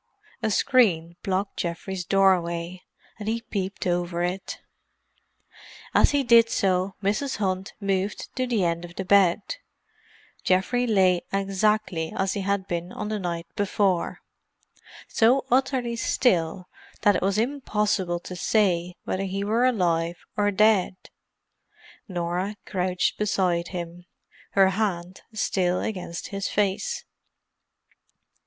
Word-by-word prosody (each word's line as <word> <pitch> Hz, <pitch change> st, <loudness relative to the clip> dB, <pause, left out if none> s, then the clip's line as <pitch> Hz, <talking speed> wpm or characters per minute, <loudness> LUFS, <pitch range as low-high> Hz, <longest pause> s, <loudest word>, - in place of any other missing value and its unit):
A -, -, +1 dB
screen 190 Hz, -8 st, +3 dB
blocked 195 Hz, +1 st, -2 dB
Geoffrey's 180 Hz, +2 st, -3 dB
doorway, 180 Hz, -2 st, +1 dB, 0.4 s
and 210 Hz, 0 st, -3 dB
he 230 Hz, +1 st, -1 dB
peeped 195 Hz, -4 st, -4 dB
over 175 Hz, -1 st, 0 dB
it. 180 Hz, +2 st, -3 dB, 1.3 s
As -, -, +5 dB
he 285 Hz, -1 st, +1 dB
did 235 Hz, -2 st, +6 dB
so, 190 Hz, -1 st, +1 dB
Mrs. 215 Hz, +8 st, 0 dB
Hunt 190 Hz, 0 st, -2 dB
moved 195 Hz, 0 st, -2 dB
to 255 Hz, -1 st, -1 dB
the 220 Hz, -7 st, +1 dB
end 170 Hz, 0 st, -1 dB
of 175 Hz, 0 st, -10 dB
the 190 Hz, -, -4 dB
bed. 195 Hz, -1 st, +4 dB, 1.0 s
Geoffrey 245 Hz, +7 st, +2 dB
lay 185 Hz, -5 st, +3 dB
exactly 195 Hz, -3 st, 0 dB
as 190 Hz, 0 st, +1 dB
he 200 Hz, -, -2 dB
had 200 Hz, 0 st, -1 dB
been 175 Hz, +1 st, -3 dB
on 210 Hz, -, -5 dB
the 215 Hz, -1 st, -2 dB
night 170 Hz, -2 st, -3 dB
before; 195 Hz, -3 st, 0 dB, 0.9 s
so 245 Hz, +4 st, +3 dB
utterly 255 Hz, -2 st, +1 dB
still 180 Hz, -7 st, +1 dB, 0.3 s
that 205 Hz, -1 st, +4 dB
it -, -, 0 dB
was 195 Hz, +1 st, +1 dB
impossible 210 Hz, -8 st, 0 dB
to 180 Hz, -, -8 dB
say 180 Hz, -3 st, +1 dB
whether 195 Hz, +1 st, -2 dB
he 195 Hz, +1 st, -3 dB
were 225 Hz, +4 st, +2 dB
alive 170 Hz, -8 st, 0 dB
or 205 Hz, 0 st, +2 dB
dead. 205 Hz, -2 st, +3 dB, 1.1 s
Norah 180 Hz, +2 st, -2 dB
crouched 180 Hz, -1 st, -1 dB
beside 180 Hz, -5 st, +1 dB
him, 175 Hz, -1 st, -7 dB, 0.5 s
her 195 Hz, -1 st, +5 dB
hand 185 Hz, -3 st, -2 dB
still 180 Hz, -4 st, 0 dB
against 180 Hz, -5 st, -4 dB
his 195 Hz, -1 st, -3 dB
face. 210 Hz, -, -1 dB
190 Hz, 125 wpm, -25 LUFS, 180-210 Hz, 1.3 s, did